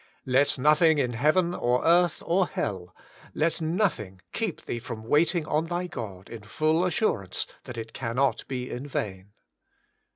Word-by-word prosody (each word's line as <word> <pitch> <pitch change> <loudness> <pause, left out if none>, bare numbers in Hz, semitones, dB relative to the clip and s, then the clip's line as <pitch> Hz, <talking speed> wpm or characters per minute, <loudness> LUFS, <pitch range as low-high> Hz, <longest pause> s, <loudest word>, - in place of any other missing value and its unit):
Let 135 +2 +2
nothing 150 +3 +4
in 125 -4 0
heaven 155 +8 +2
or 125 -5 0
earth 175 +1 +3
or 185 +2 +2
hell 90 -3 -4 0.2
— - - -22
let 165 +2 0
nothing 160 - -1
keep 220 -7 -3
thee 120 - -3
from 115 -2 -7
waiting 155 +6 +2
on 155 +2 0
thy 175 +1 -2
God 100 - -7
in 115 - -9
full 155 +10 +1
assurance 165 - 0 0.2
that 125 -2 -8
it 115 0 -6
cannot 130 +2 0
be 125 -2 -4
in 130 +4 -5
vain. 95 -7 -4
140 Hz, 160 wpm, -27 LUFS, 115-170 Hz, 0.2 s, nothing